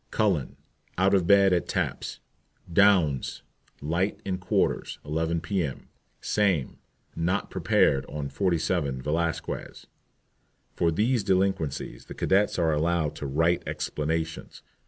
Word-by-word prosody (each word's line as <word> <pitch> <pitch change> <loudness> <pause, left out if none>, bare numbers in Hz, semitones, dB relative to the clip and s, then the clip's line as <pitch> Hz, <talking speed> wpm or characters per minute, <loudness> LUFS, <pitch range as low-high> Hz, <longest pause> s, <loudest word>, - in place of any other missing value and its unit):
CULLEN. 95 -10 0 0.4
Out 95 +2 +3
of 95 -4 +3
bed 100 -1 +6
at 85 -3 0
taps. - - -3 0.5
DOUNS. 90 -9 +3 0.4
Light 85 +7 -1
in 95 -2 -2
quarters, 90 - 0
11 80 +2 -1
p.m. 80 -6 -3 0.3
SAME. 95 -11 0 0.4
Not 90 +4 -1
prepared 70 0 +2
on 75 -2 -4
47 80 -4 0
Velasquez.* 80 +3 -3 0.9
*For 85 - +2
these 110 +7 +1
delinquencies 95 -7 -1
the - - -9
cadets 100 +2 +2
are 80 -2 +2
allowed 80 -1 0
to 70 - -4
write 80 +5 +2
explanations. 80 +1 -3
85 Hz, 115 wpm, -27 LUFS, 75-95 Hz, 0.9 s, bed